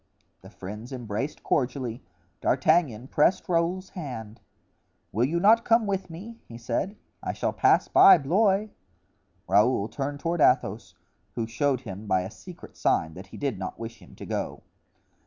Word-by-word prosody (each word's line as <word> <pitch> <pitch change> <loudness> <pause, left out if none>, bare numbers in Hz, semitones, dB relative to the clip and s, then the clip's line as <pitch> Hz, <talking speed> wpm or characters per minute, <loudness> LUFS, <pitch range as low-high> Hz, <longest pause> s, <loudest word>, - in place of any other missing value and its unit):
The - - -13
friends 105 +6 -9
embraced 125 +2 -4
cordially; 125 -2 -1 0.4
D'Artagnan 130 -4 +2
pressed 165 +5 +2
Raoul's 175 +2 0
hand. 120 - -7 0.7
"Will 115 +4 +2
you 165 +6 0
not 220 +5 +5
come 230 -1 +3
with 195 -2 -2
me?" 210 +8 -9
he 115 - -10
said; 120 - -2 0.3
"I - - -3
shall - - -2
pass - - +3
by 195 - +8
Blois." 195 +7 +2 0.8
Raoul 105 -1 +3
turned 140 +5 -4
toward 170 +1 -1
Athos, 100 -8 +2 0.4
who 115 - -1
showed 130 +3 0
him 105 -2 -8
by 95 -2 +2
a 95 +3 -6
secret 180 - -12
sign 80 0 +1
that 95 +4 -10
he - - -11
did 135 -9 -2
not 95 - -5
wish 115 0 -8
him - - -16
to - - -9
go. - - -4
135 Hz, 155 wpm, -26 LUFS, 110-175 Hz, 0.8 s, by